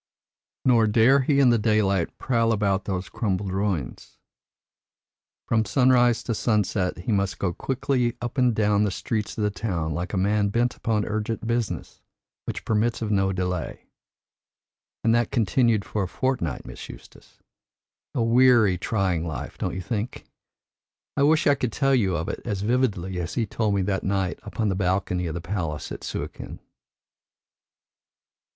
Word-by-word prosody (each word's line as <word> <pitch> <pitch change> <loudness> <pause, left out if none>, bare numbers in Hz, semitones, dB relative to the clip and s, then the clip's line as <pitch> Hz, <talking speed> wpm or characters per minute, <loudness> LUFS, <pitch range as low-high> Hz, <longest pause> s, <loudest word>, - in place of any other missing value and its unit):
Nor 115 -4 +5
dare 115 +6 +5
he 140 +1 +2
in 130 -3 +6
the 120 - +3
daylight 105 -4 +1
prowl 115 -3 +1
about 100 -3 +1
those 95 -1 -3
crumbled 100 -3 -2
ruins. 95 -8 -3 1.3
From 110 -1 +2
sunrise 125 -1 +3
to 115 - -2
sunset 105 -4 0
he - - 0
must 100 -2 0
go 90 -3 -1
quickly 125 +1 -1
up 120 +2 -4
and 125 -3 +3
down 105 -1 +2
the 105 - +1
streets 105 +2 -3
of 110 - -1
the 105 - +1
town 85 -6 -2
like 85 +4 -3
a 100 - -2
man 100 +2 +2
bent 120 +4 0
upon 110 -2 -1
urgent 110 +1 -3
business 115 -1 -3 0.4
which - - -5
permits 110 +1 0
of 110 - -2
no 95 -1 +2
delay. 90 -2 -3 1.2
And 115 - +3
that 120 -1 +2
continued 110 0 +2
for 105 - -2
a 95 - -1
fortnight, 120 - -2
Miss - - -9
Eustace! - - -14 0.8
A 120 - +1
weary, 115 -5 +5
trying 95 -6 0
life, 80 -7 -5
don't - - -2
you 95 - -3
think? 110 +4 -4 0.9
I - - 0
wish 155 +3 +4
I 145 - +6
could 125 -4 -2
tell 135 +4 +1
you 100 -8 +2
of 80 - -3
it - - -4
as 100 -5 -3
vividly 105 -6 0
as 85 +1 -4
he 115 - +1
told 105 0 -1
me 95 - +1
that 95 0 -1
night 95 -2 -1
upon 110 -2 -2
the - - +1
balcony 90 -1 0
of 80 - -4
the 85 - -4
palace 85 -4 -4
at - - -7
Suakin." - - -6
105 Hz, 165 wpm, -25 LUFS, 95-120 Hz, 1.3 s, in